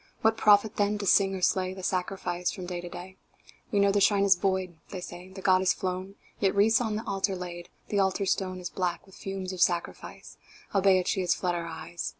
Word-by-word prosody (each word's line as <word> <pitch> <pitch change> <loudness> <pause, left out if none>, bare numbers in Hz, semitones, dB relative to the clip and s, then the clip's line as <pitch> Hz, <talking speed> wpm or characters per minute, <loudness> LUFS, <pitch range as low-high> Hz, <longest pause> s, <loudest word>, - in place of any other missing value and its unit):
What 220 0 +3
profit, 210 0 +4
then, 205 0 +1
to 205 - -4
sing 195 0 +4
or 185 - -6
slay 185 0 +1
The 190 - -9
sacrifice 180 -1 -2
from 185 - -6
day 175 -1 -4
to 175 - -8
day? 185 +2 -9 0.5
"We 205 - +2
know 200 0 +4
the 200 0 +1
Shrine 200 0 +4
is 200 -1 +6
void," 185 -3 -2
they 185 - -6
said, 180 +1 -10
"The 190 - -8
Goddess 185 0 +4
flown 185 +1 -4 0.2
Yet 195 -1 +1
wreaths 220 +5 +4
are - - 0
on 215 - -2
the 220 - -4
Altar 195 0 -1
laid 175 -1 -7 0.2
The 205 - +1
Altar 195 +1 +1
Stone 185 -1 -1
Is 180 -1 -6
black 180 -2 -2
with 190 - -19
fumes 195 -1 -5
of 180 - -5
sacrifice, 175 -1 -2 0.4
Albeit 190 -2 +3
She 190 - +1
has 180 - +2
fled 180 -1 -1
our 170 -1 -3
eyes. 165 +1 -5
190 Hz, 225 wpm, -28 LUFS, 180-200 Hz, 0.5 s, is